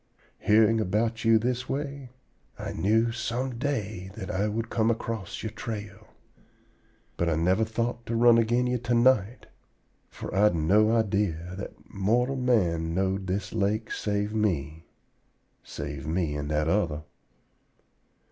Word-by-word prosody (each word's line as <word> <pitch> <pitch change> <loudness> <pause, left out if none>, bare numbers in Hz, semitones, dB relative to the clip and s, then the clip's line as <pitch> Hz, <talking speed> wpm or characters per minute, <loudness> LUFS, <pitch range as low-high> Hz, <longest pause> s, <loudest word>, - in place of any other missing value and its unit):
Hearing 110 +1 +4
about 110 +4 0
you 115 0 +5
this 125 +2 -2
way, 140 -2 -4 0.5
I - - -5
knew 110 +6 +2
some 120 +1 -3
day 110 -9 -3
that 105 -2 -5
I 100 +1 0
would 115 +2 -3
come 110 0 +2
across 115 -4 -3
your 110 - -3
trail; 105 -1 -7 1.1
but 85 - +1
I 80 - +1
never 90 +7 +2
thought 115 +2 -2
to 115 - -1
run 115 0 +6
agin 120 +2 +2
you 125 0 0
to 120 0 0
night, 120 -2 +3 0.6
for - - -8
I'd 100 -1 +4
no 105 +7 +3
idee 100 -5 +1 0.2
that 95 +2 -6
mortal 120 +7 +1
man 90 -11 +1
knowed 95 0 0
this 95 +1 -3
lake, 110 +1 0
save 105 0 -1
me 80 -7 -1 0.8
save 70 0 -6
me 80 -2 0
and 75 0 -4
that 75 0 0
other. 80 -5 0
105 Hz, 140 wpm, -27 LUFS, 95-115 Hz, 1.1 s, run